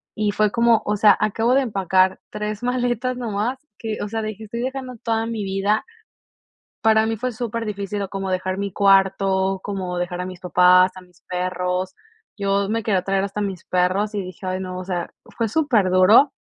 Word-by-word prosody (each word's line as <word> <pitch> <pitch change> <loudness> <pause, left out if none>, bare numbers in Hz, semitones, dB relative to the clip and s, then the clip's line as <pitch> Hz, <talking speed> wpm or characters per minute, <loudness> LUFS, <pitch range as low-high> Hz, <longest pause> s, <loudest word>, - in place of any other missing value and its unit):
y 210 -1 0
fue 210 0 +1
como, 235 -1 +3
o 210 - 0
sea, 205 -1 +6
acabo 225 +4 +1
de 275 - +4
empacar 190 -5 +1
3 210 +1 -4
maletas 245 0 -1
nomás 230 +2 -2 0.2
que, 220 -2 -4
o - - -3
sea, 225 0 -2
dije: 215 0 -6
"Estoy 235 +3 -5
dejando 260 -1 -4
toda 225 -1 0
mi 225 -2 -3
vida." 195 +2 0 1.0
Para 220 0 +4
mí 225 -1 -2
fue 255 +3 -2
súper 230 -1 -4
difícil, 205 -1 -4
o 195 - -6
como 195 -1 -4
dejar 185 +1 -1
mi 200 -1 -3
cuarto, 195 -1 +3
como 185 -3 -4
dejar 175 0 -3
a - - -4
mis 185 -1 -8
papás, 180 +1 +5
a 185 - -10
mis 180 -1 -22
perros. 180 0 -2 0.4
Yo 200 0 0
me 225 0 -1
quería 195 -4 +1
traer 195 0 0
hasta 200 +1 -3
mis 195 -3 -4
perros 185 +4 +1
y 205 - -1
dije: 185 +1 -9
"Ay 185 0 -2
no." 185 -1 -5
O 185 - -5
sea, 175 -2 -3 0.2
fue 230 - 0
súper 235 -9 +2
duro 200 +10 +6
200 Hz, 195 wpm, -22 LUFS, 185-225 Hz, 1.0 s, sea